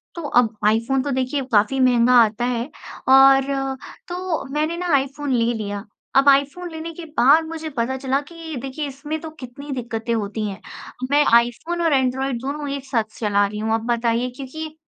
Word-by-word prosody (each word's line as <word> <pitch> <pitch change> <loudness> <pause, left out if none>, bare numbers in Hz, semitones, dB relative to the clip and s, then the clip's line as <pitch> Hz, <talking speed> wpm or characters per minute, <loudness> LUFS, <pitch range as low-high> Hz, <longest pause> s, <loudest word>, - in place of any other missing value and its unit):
तो 340 - -5
अब 240 -4 +2
आईफोन 230 +5 +2
तो 285 - -2
देखिए 260 +2 -1
काफ़ी 215 +6 +3
महँगा 250 -1 +4
आता 220 +3 -1
है 245 +1 -2 0.4
और, 270 0 +5 0.3
तो 355 -4 -3
मैंने 310 +3 -1
ना 355 -3 -1
आईफोन 275 +1 -1
ले 235 0 +2
लिया, 205 -1 -5 0.3
अब 275 +1 +6
आईफोन 280 +6 +2
लेने 325 +1 -6
के 335 0 -9
बाद 305 +6 +6
मुझे 320 -1 -5
पता 250 +3 0
चला 265 +1 0
कि 330 -2 -8
देखिए 275 +3 -4
इसमें 295 +3 -5
तो 320 - -6
कितनी 275 +3 -9
दिक्कतें 235 -2 -3
होती 215 0 -2
हैं। 195 - -7 0.5
मैं 290 +1 +5
आईफोन 240 +9 -1
और 325 -3 +2
एंड्रॉयड 265 -1 0
दोनों 285 +2 -4
एक 275 -1 -7
साथ 240 -4 0 0.2
चला 205 -2 +2
रही 210 +1 -6
हूँ 220 +1 -1
आप 225 - +1
बताइए 235 +1 0
क्योंकि, 310 +4 -7
265 Hz, 180 wpm, -21 LUFS, 235-295 Hz, 0.5 s, अब